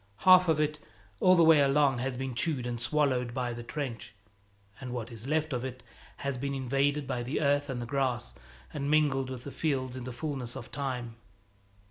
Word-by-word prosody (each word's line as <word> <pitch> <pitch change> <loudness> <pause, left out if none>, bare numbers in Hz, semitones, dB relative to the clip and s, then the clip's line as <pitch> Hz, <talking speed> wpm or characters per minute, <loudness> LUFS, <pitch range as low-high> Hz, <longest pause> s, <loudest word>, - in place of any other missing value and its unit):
Half 185 -1 +8
of 160 -2 +3
it, 150 0 0 0.4
all 185 0 +6
the 170 - +5
way 160 -2 +7
along, 140 -2 +3
has 130 0 -2
been 135 0 -3
chewed 130 0 -1
and 120 -1 -3
swallowed 125 -2 +1
by 125 -2 -1
the 120 - -6
trench; 125 -2 -5 0.6
and 125 -2 -6
what 120 -1 -5
is 115 +2 -8
left 155 0 0
of 125 -1 -2
it 130 -1 -6 0.4
has 140 -2 -1
been 140 +1 -2
invaded 140 +2 0
by 125 -2 -2
the 125 +5 -2
earth 145 -1 +2
and 130 -2 -3
the 120 - -4
grass, 130 -2 -1 0.4
and 140 +1 -2
mingled 145 -4 +2
with 130 -2 -6
the 140 - -7
fields 130 -5 -1
in 130 - -6
the 130 - -5
fullness 125 -2 -5
of - - -8
time. 125 -5 -4
135 Hz, 200 wpm, -30 LUFS, 125-145 Hz, 0.6 s, Half